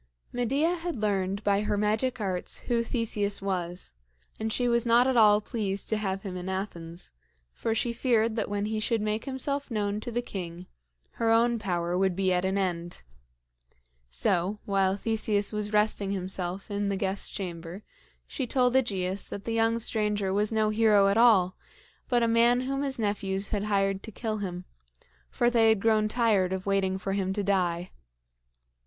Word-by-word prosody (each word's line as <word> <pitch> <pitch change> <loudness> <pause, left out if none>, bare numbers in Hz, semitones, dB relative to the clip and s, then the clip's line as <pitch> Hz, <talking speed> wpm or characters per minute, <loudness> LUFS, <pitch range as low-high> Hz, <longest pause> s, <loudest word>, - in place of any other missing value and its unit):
Medea 275 +9 +1
had 345 0 -4
learned 200 -2 -1
by 200 0 +2
her 210 -1 -1
magic 215 +5 0
arts 185 -4 -2
who 235 -2 0
Theseus 215 -4 -1
was, 180 - -4 0.5
and 220 0 -2
she 245 +2 +1
was 235 -1 +2
not 235 +1 +4
at 260 -1 +1
all 210 -2 +6
pleased 200 -3 -2
to 220 - +1
have 195 -2 -3
him 190 -3 -5
in 180 +1 -5
Athens; 175 - -5 0.4
for 225 -1 -2
she 235 +1 0
feared 230 -2 +1
that 220 -3 -2
when 205 0 -1
he 215 0 -2
should 225 +1 0
make 215 +1 -2
himself 280 +1 -3
known 210 -2 -1
to 240 - -6
the 240 +1 -1
king, 180 -4 -6 0.6
her 230 - +3
own 230 +1 +3
power 175 -4 -1
would 190 -1 +1
be 190 -1 +1
at 180 +1 0
an 190 +1 0
end. 175 - -3 1.1
So, 175 - +1
while 195 -1 +2
Theseus 215 -1 0
was 210 0 -2
resting 210 -2 +1
himself 185 0 -3
in 205 0 -1
the 195 - -1
guest 195 +1 -2
chamber, 175 +1 -6 0.4
she 265 - -4
told 250 0 +2
AEgeus 195 -7 0
that 200 - -6
the 230 - -3
young 225 0 +2
stranger 210 -4 0
was 210 +2 +1
no 220 -1 +2
hero 210 -2 +4
at 200 - +1
all, 195 -6 +5 0.5
but 240 -2 +3
a - - +3
man 235 +2 +4
whom 275 +2 -2
his 275 -2 -1
nephews 200 -2 -2
had 205 -1 -1
hired 195 -2 +1
to 220 - -9
kill 220 0 -3
him, 180 -2 -5 0.6
for 240 - +1
they 225 -2 +4
had 220 -2 +3
grown 215 0 +2
tired 215 -5 +2
of 190 0 -4
waiting 195 -1 +1
for 195 +1 -3
him 190 -1 -1
to 205 0 -2
die. 180 -3 0
205 Hz, 180 wpm, -28 LUFS, 190-230 Hz, 1.1 s, all